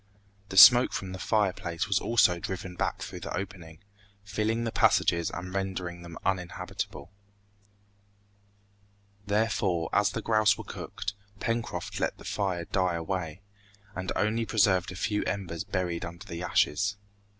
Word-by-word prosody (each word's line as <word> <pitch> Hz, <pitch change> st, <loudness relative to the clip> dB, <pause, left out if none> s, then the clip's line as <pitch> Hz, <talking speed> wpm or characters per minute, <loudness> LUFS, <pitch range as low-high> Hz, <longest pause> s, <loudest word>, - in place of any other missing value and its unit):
The 95 Hz, -, -5 dB
smoke 120 Hz, +5 st, +9 dB
from 95 Hz, -1 st, -4 dB
the 95 Hz, -, -6 dB
fireplace 95 Hz, -4 st, 0 dB
was 100 Hz, -2 st, +2 dB
also 90 Hz, -7 st, +3 dB
driven 95 Hz, +1 st, -5 dB
back -, -, -2 dB
through -, -, -7 dB
the -, -, -4 dB
opening, 90 Hz, -3 st, -7 dB, 0.4 s
filling 110 Hz, +3 st, -1 dB
the 115 Hz, -, -2 dB
passages 85 Hz, -5 st, +3 dB
and 90 Hz, +1 st, -6 dB
rendering 95 Hz, -3 st, -3 dB
them 85 Hz, -1 st, -9 dB
uninhabitable. 90 Hz, -4 st, -3 dB, 2.2 s
Therefore, 100 Hz, -5 st, +1 dB
as 105 Hz, 0 st, +4 dB
the 115 Hz, +2 st, -4 dB
grouse 110 Hz, -2 st, +3 dB
were -, -, -7 dB
cooked, 105 Hz, -, -5 dB, 0.3 s
Pencroft 115 Hz, 0 st, -3 dB
let -, -, -1 dB
the -, -, -13 dB
fire 95 Hz, -4 st, -1 dB
die 90 Hz, -2 st, 0 dB
away, 85 Hz, 0 st, -3 dB, 0.5 s
and 95 Hz, 0 st, -3 dB
only 110 Hz, +2 st, +1 dB
preserved 95 Hz, -5 st, +2 dB
a -, -, -8 dB
few 105 Hz, +3 st, -1 dB
embers 90 Hz, -4 st, -3 dB
buried 90 Hz, -4 st, -2 dB
under 85 Hz, +3 st, -8 dB
the 85 Hz, -3 st, -6 dB
ashes. 100 Hz, +4 st, +1 dB
95 Hz, 140 wpm, -28 LUFS, 85-105 Hz, 2.2 s, smoke